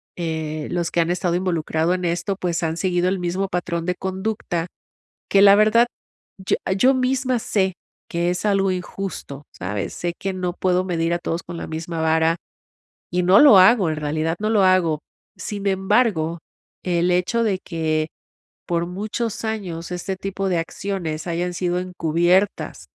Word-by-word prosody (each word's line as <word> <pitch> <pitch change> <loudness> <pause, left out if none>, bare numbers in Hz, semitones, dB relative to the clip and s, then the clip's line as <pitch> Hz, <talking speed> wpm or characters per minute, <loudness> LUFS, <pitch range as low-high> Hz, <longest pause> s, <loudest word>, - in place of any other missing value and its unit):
eh, 160 -2 -3
los 170 -1 -1
que 170 - 0
han 165 0 +2
estado 180 -1 0
involucrado 170 -2 0
en 180 - -3
esto, 175 +3 -1
pues, 170 -2 -1
han 160 +1 -1
seguido 180 -1 +1
el 190 - 0
mismo 180 +2 -1
patrón 170 -2 -2
de 180 - 0
conducta. 190 -3 -3 0.7
Que 195 - +5
la 200 0 +9
verdad, 215 +3 +5 0.5
yo 190 - 0
eh, 190 - +1
yo 260 +6 +4
misma 255 -1 +1
sé 190 -3 0 0.4
que 170 +1 0
es 180 +2 -3
algo 195 -1 +2
injusto, 180 -5 -5
¿sabes? 100 +2 -4
Sé 175 -1 -2
que 195 0 -2
no 180 -1 -2
puedo 185 -1 +1
medir 170 -2 -1
a 175 - -1
todos 165 0 -3
con 175 0 -8
la - - -5
misma 160 +1 -5
vara, 160 +1 +3 0.7
y 180 +1 0
no 185 +3 +6
lo 280 -10 +9
hago. 190 -1 +6
En 155 - -2
realidad, 155 +2 -1
no 215 - 0
lo 210 -3 +4
hago. 175 -5 +3 0.4
Sin 200 +2 -5
embargo, 190 -4 +1 0.4
el 175 0 +1
hecho 180 +6 +1
de 200 -4 +1
que, 155 -2 -1 0.6
por 170 0 0
muchos 210 +5 -4
años, 185 -7 -4
este 180 +2 -3
tipo 195 0 -3
de 180 - +1
acciones 165 -2 -4
hayan 175 +1 -2
sido 175 0 -1
encubiertas, 180 +2 0
180 Hz, 170 wpm, -22 LUFS, 165-195 Hz, 0.7 s, la